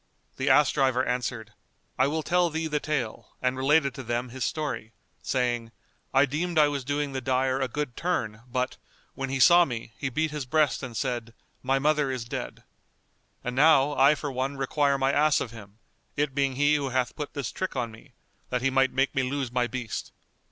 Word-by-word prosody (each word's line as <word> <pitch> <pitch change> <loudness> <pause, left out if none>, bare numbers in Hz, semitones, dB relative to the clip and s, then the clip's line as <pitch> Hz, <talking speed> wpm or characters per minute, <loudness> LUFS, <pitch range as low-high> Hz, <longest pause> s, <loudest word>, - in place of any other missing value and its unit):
The 135 +2 0
ass 150 - +5
driver 130 -2 +2
answered, 120 -3 -3 0.4
"I 130 - +3
will 155 +2 -1
tell 175 +1 +2
thee 160 +1 -2
the 150 -2 0
tale," 145 -8 -4
and 125 0 0
related 140 +1 +3
to 135 - -7
them 120 +1 -2
his 130 +2 -5
story, 125 -8 -3 0.3
saying, 120 -3 -1 0.4
"I 135 +2 +5
deemed 160 +5 -2
I 150 -1 +6
was 140 -2 -3
doing 145 +1 -1
the 135 -1 -3
dyer 130 +1 +1
a 130 - +1
good 145 -1 -4
turn; 110 -12 -2
but, 125 +1 -2 0.4
when 135 0 -4
he 135 0 -2
saw 175 +5 +8
me 120 -7 -5
he 140 - -1
beat 155 +4 -1
his 150 -4 -5
breast 150 +1 +2
and 125 -4 -6
said, 120 -3 -3 0.3
'My 135 +1 +1
mother 150 0 +2
is 130 -3 -3
dead.' - - -6 0.8
And 125 0 -3
now, 145 0 +5
I 140 +3 +5
for 145 -1 -4
one 135 +2 -2
require 140 +1 +1
my 135 0 +2
ass 150 +1 +3
of 120 - -4
him, 105 -2 -12 0.4
it 145 -1 0
being 135 -1 0
he 145 +2 +3
who 145 -2 0
hath 125 -1 -1
put 150 -1 -6
this 140 -5 -3
trick 185 -4 -4
on 120 -3 -2
me, 115 +4 -16 0.4
that 125 -1 -1
he 135 - +2
might 135 0 +3
make 135 +1 +1
me 135 - +1
lose 130 -1 -2
my 125 -1 +1
beast." 125 -3 -5
135 Hz, 205 wpm, -27 LUFS, 125-145 Hz, 0.8 s, saw